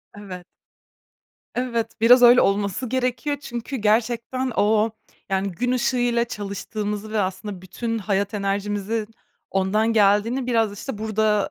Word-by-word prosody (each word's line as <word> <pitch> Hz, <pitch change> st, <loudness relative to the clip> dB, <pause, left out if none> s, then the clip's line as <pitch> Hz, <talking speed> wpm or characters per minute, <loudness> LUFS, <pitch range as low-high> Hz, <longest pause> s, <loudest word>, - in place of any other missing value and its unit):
Evet. 185 Hz, -4 st, -9 dB, 1.1 s
Evet, 240 Hz, -2 st, -2 dB
biraz 245 Hz, +2 st, +7 dB
öyle 245 Hz, +1 st, +8 dB
olması 200 Hz, +4 st, 0 dB
gerekiyor. 255 Hz, +3 st, -1 dB
Çünkü 240 Hz, 0 st, -5 dB
gerçekten 235 Hz, +3 st, 0 dB
o, 215 Hz, +1 st, +3 dB, 0.4 s
yani 195 Hz, +1 st, 0 dB
gün 245 Hz, +8 st, -1 dB
ışığıyla 245 Hz, -1 st, +1 dB
çalıştığımızı 210 Hz, 0 st, -5 dB
ve 215 Hz, -, +1 dB
aslında 190 Hz, 0 st, -4 dB
bütün 225 Hz, +5 st, -3 dB
hayat 200 Hz, 0 st, -1 dB
enerjimizin 205 Hz, +2 st, -2 dB, 0.4 s
ondan 210 Hz, +4 st, +1 dB
geldiğini 220 Hz, +5 st, +3 dB
biraz 225 Hz, -4 st, +1 dB
işte 250 Hz, -7 st, -6 dB
burada, 215 Hz, -1 st, +1 dB
220 Hz, 120 wpm, -23 LUFS, 200-240 Hz, 1.1 s, öyle